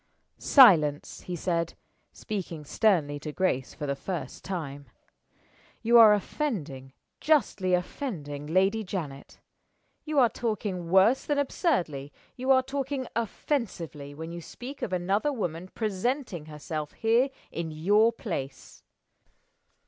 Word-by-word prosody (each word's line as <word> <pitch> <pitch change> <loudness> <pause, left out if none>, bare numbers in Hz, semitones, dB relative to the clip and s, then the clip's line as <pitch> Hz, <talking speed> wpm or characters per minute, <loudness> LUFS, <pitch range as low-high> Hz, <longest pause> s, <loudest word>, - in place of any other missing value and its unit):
"Silence!" 160 - +5
he 180 - -3
said, 170 -1 -1 0.4
speaking 175 -8 -6
sternly 150 -6 +2
to 150 - -6
Grace 145 -7 -1
for 150 - -5
the 140 -1 -1
first 175 +4 -6
time. 145 -7 -5 1.0
"You 235 +1 +6
are 220 -2 +9
offending 165 - -4 0.3
justly 205 -12 +2
offending 155 - -5
Lady 190 +6 +2
Janet. 160 -8 -6 0.6
You 305 -1 -3
are 255 -3 +7
talking 205 -7 -3
worse 195 +8 +5
than 290 - 0
absurdly 180 - 0 0.2
you 255 +1 -4
are 260 -1 +6
talking 270 0 -3
offensively 185 - -3
when 160 +2 -7
you 170 0 -6
speak 260 - -9
of - - -3
another 195 +9 0
woman 180 - -4
presenting 215 - -2
herself 150 0 -5
here 235 +4 +2 0.2
in 165 -1 -4
your 205 +9 +3
place." 140 - -6
185 Hz, 120 wpm, -28 LUFS, 155-235 Hz, 1.0 s, are